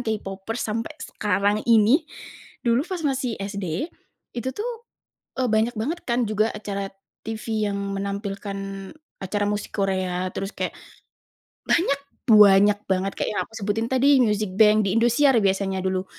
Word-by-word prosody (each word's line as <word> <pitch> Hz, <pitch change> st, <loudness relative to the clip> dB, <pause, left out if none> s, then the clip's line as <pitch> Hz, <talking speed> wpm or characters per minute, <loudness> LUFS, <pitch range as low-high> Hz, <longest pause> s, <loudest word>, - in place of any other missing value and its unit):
K-Popers 215 Hz, -1 st, -4 dB
sampai 225 Hz, +1 st, -3 dB
sekarang 205 Hz, +1 st, 0 dB
ini, 235 Hz, +8 st, +5 dB, 0.6 s
dulu 235 Hz, +1 st, +3 dB
pas 365 Hz, -4 st, -4 dB
masih 265 Hz, -4 st, -1 dB
SD 195 Hz, -, -3 dB, 0.4 s
itu 240 Hz, +1 st, -3 dB
tuh, 460 Hz, +4 st, -2 dB, 0.7 s
eee, 250 Hz, -, +1 dB
banyak 220 Hz, +2 st, +2 dB
banget 270 Hz, +10 st, -3 dB
kan 240 Hz, -2 st, 0 dB
juga 215 Hz, +1 st, +1 dB
acara 200 Hz, -2 st, -4 dB, 0.4 s
TV 220 Hz, -1 st, -2 dB
yang -, -, -2 dB, 0.2 s
menampilkan 200 Hz, 0 st, -4 dB, 0.6 s
acara 205 Hz, +2 st, -2 dB
musik 205 Hz, 0 st, -3 dB
Korea, 185 Hz, -2 st, -1 dB
terus 195 Hz, +2 st, -5 dB
kayak -, -, -3 dB, 0.9 s
banyak 280 Hz, -5 st, +2 dB, 0.3 s
banyak 205 Hz, -1 st, +6 dB
banget 190 Hz, +1 st, 0 dB
kayak -, -, -1 dB
yang -, -, +2 dB
aku -, -, -20 dB
sebutin 220 Hz, +3 st, -1 dB
tadi 265 Hz, +2 st, +4 dB
Music 210 Hz, -4 st, +1 dB
Bank 210 Hz, +1 st, +5 dB
di 195 Hz, -, 0 dB
Indosiar 240 Hz, +5 st, +4 dB
biasanya 195 Hz, -1 st, 0 dB
dulu. 185 Hz, 0 st, -1 dB
210 Hz, 140 wpm, -24 LUFS, 195-235 Hz, 0.9 s, banyak